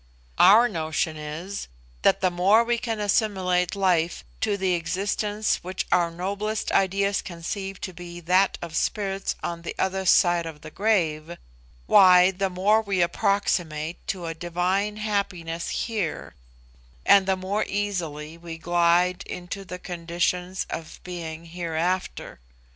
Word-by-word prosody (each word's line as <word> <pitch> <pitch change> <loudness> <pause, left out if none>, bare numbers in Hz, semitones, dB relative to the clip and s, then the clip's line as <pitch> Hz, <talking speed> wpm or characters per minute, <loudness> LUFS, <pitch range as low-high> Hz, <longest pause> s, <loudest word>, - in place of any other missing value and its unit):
Our 215 +7 +8
notion 160 -4 -2
is, 155 +6 -6 0.3
that - - +3
the 185 -1 +2
more 195 +6 +4
we 235 0 0
can 225 -2 -3
assimilate 195 -3 +1
life 175 -4 +1 0.2
to 210 -2 0
the 190 -2 +1
existence 200 +5 -1
which 185 +1 -4
our 175 -1 +3
noblest 200 +5 -3
ideas 195 +1 +2
can 175 - -8
conceive 195 +3 -5
to 185 - -5
be 175 0 -9
that 185 +3 +3
of 165 -1 -7
spirits 195 0 -1
on 170 -1 -3
the 170 - -6
other 190 0 -1
side 175 -1 +4
of 150 -2 -9
the 155 - -10
grave, 170 -6 0 0.5
why, 180 - +7
the 195 +1 -1
more 200 +4 +3
we 195 -4 +1
approximate 170 -3 0
to 180 -3 -3
a 165 - -3
divine 180 +5 -1
happiness 195 -6 -2 0.2
here, 210 -9 -3 0.7
and 200 -1 +6
the 190 -1 +2
more 195 +3 -1
easily 170 -6 -3
we 165 -1 -8
glide 175 +1 +2
into 180 +2 -6
the 180 -1 -7
conditions 180 +1 -2
of 160 -1 -6
being 170 -2 -6
hereafter. 170 - -3
180 Hz, 140 wpm, -25 LUFS, 170-200 Hz, 0.7 s, Our